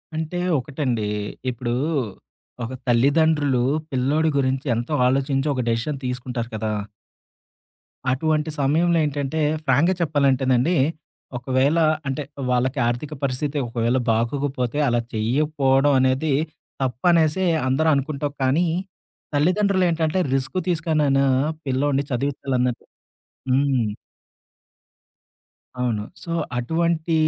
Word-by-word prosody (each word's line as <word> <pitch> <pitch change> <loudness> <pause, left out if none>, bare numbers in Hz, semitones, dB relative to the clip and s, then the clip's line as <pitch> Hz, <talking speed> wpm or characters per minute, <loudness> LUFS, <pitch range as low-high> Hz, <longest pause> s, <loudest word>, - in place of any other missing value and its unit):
అంటే 160 +3 -3 0.2
ఒకటండి. 125 -5 -2 0.4
ఇప్పుడు 120 -1 -3 0.9
ఒక 115 +3 -5
తల్లిదండ్రులు 140 +1 +3 0.3
పిల్లోడి 140 +5 +1
గురించి 130 +1 0
ఎంతో 120 +6 -3
ఆలోచించి 135 +2 +1
ఒక 130 - -1
డెసిషన్ 115 +6 -1
తీసుకుంటారు 125 -1 -3
కదా! 110 0 -2 1.4
అటువంటి 155 +3 0
సమయంలో 165 +5 +2
ఏంటంటే 145 +1 -2 0.3
ఫ్రాంక్‌గా 155 +8 +3
చెప్పాలంటేనండి. 135 -1 +2 0.6
ఒకవేళ 130 +5 +1 0.3
అంటే 135 +2 -2 0.3
వాళ్ళకి 125 +2 +1
ఆర్థిక 120 +6 -3
పరిస్థితి 140 +2 -1
ఒకవేళ 115 +2 0
బాగొకపోతే 125 +3 -1
అలా 120 -1 +2
చేయకపోవడం 135 +4 +2
అనేది 130 +3 +2 0.5
తప్పనేసే 160 +7 +2 0.2
అందరూ 140 +5 +2
అనుకుంటావు 140 +1 -2
కానీ. 145 +7 +2 0.7
తల్లిదండ్రులేంటంటే 180 0 +2
రిస్క్ 135 +7 -1
తీసుకనైనా 155 -5 +2 0.4
పిల్లోడిని 140 +1 +1
చదివించాలన్న 130 -1 0 0.8
హ్మ్. 130 -3 +2 2.0
అవును. 115 -4 0 0.2
సో 170 - -6 0.3
అటువంటి 165 +5 0
135 Hz, 90 wpm, -23 LUFS, 125-155 Hz, 2.0 s, తల్లిదండ్రులు